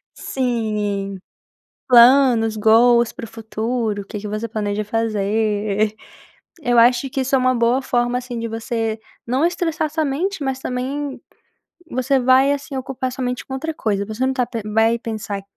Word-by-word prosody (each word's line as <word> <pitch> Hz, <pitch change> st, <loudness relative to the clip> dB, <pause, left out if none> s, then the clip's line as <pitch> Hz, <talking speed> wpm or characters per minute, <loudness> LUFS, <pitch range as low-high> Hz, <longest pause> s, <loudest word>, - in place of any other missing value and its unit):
Sim, 210 Hz, -6 st, -2 dB, 0.7 s
planos, 240 Hz, -2 st, +6 dB
goals 235 Hz, +2 st, +4 dB
para -, -, -8 dB
o -, -, -9 dB
futuro, 220 Hz, -1 st, -3 dB
o -, -, -13 dB
que 210 Hz, -, -6 dB
que 210 Hz, -, -6 dB
você 215 Hz, +2 st, -3 dB
planeja 210 Hz, -1 st, -2 dB
fazer. 215 Hz, -1 st, 0 dB, 0.7 s
Eu 245 Hz, -1 st, +2 dB
acho 245 Hz, +3 st, +4 dB
que 270 Hz, -, -2 dB
isso 265 Hz, +1 st, -1 dB
é -, -, +5 dB
uma 255 Hz, 0 st, +2 dB
boa 235 Hz, +2 st, +2 dB
forma 245 Hz, -1 st, 0 dB
assim 250 Hz, -1 st, -6 dB
de 230 Hz, 0 st, -3 dB
você 225 Hz, -1 st, -3 dB, 0.3 s
não 255 Hz, +6 st, +1 dB
estressar 325 Hz, -3 st, -1 dB
somente, 315 Hz, +4 st, -1 dB
mas 265 Hz, -1 st, -2 dB
também, 265 Hz, +3 st, -4 dB, 0.7 s
você 260 Hz, +2 st, +1 dB
vai 260 Hz, +2 st, +4 dB
assim 285 Hz, 0 st, -5 dB
ocupar 260 Hz, -1 st, -3 dB
sua 255 Hz, 0 st, -4 dB
mente 250 Hz, 0 st, -3 dB
com 265 Hz, -, -6 dB
outra 320 Hz, +4 st, -3 dB
coisa, 200 Hz, -6 st, -1 dB
você 220 Hz, +4 st, -5 dB
não 265 Hz, -, +1 dB
está 255 Hz, -2 st, 0 dB
pen 230 Hz, -3 st, -5 dB
vai 225 Hz, +2 st, +2 dB
pensar, 215 Hz, -3 st, -5 dB
240 Hz, 165 wpm, -20 LUFS, 220-260 Hz, 0.7 s, planos